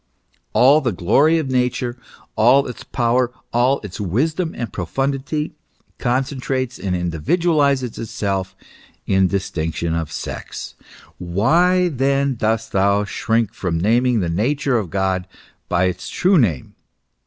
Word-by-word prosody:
All 140 +5 +6
the 125 -5 0
glory 125 - +3
of 145 -5 -2
Nature, 125 -1 0 0.4
all 125 +6 +5
its 125 - -7
power, 120 +1 +1 0.2
all 125 +3 +3
its 105 -1 -7
wisdom 155 - -1
and 120 - -4
pro 90 -4 -4
fundity, 140 - -2 0.5
concentrates 130 0 -1
and 95 -1 -2
individualizes 130 - +1
itself 100 -4 -3 0.5
in 95 -1 +3
distinction 85 -3 -2
of 80 -2 -2
sex. - - -6 0.5
Why 170 - +2
then 140 -1 +1
dost 110 -1 -1
thou 100 +1 +2
shrink 115 +2 -1
from 90 -7 -2
naming 115 +4 +2
the 90 - -1
nature 125 - +1
of 100 -6 -5
God 95 0 -1 0.4
by 90 0 +2
its 90 -1 -2
true 185 -1 +3
name 90 - 0
120 Hz, 130 wpm, -20 LUFS, 95-135 Hz, 0.5 s, All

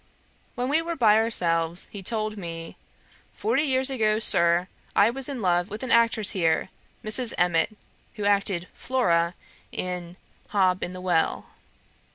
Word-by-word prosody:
When 250 +1 -2
we 300 +4 +2
were 335 +1 -4
by 220 -7 +4
ourselves 170 -6 +1
he 200 - -6
told 215 +1 -2
me, 165 -4 -7 0.6
'Forty 440 -7 0
years 265 -2 +1
ago, 215 -4 +1
Sir, 170 -4 +4 0.3
I 210 +3 +5
was 270 +2 -3
in 260 -6 -5
love 175 0 +1
with 210 +4 -6
an 255 - -3
actress 230 -3 +3
here, 165 -4 0 0.4
Mrs. 230 +2 +2
Emmet, 180 +4 +1 0.4
who 210 -3 -4
acted 200 -3 +1
Flora, 175 -9 0 0.4
in 180 -1 -5 0.3
Hob 185 -3 +1
in 180 - -4
the 185 - -8
Well.' 175 -3 0
205 Hz, 150 wpm, -25 LUFS, 175-235 Hz, 0.6 s, I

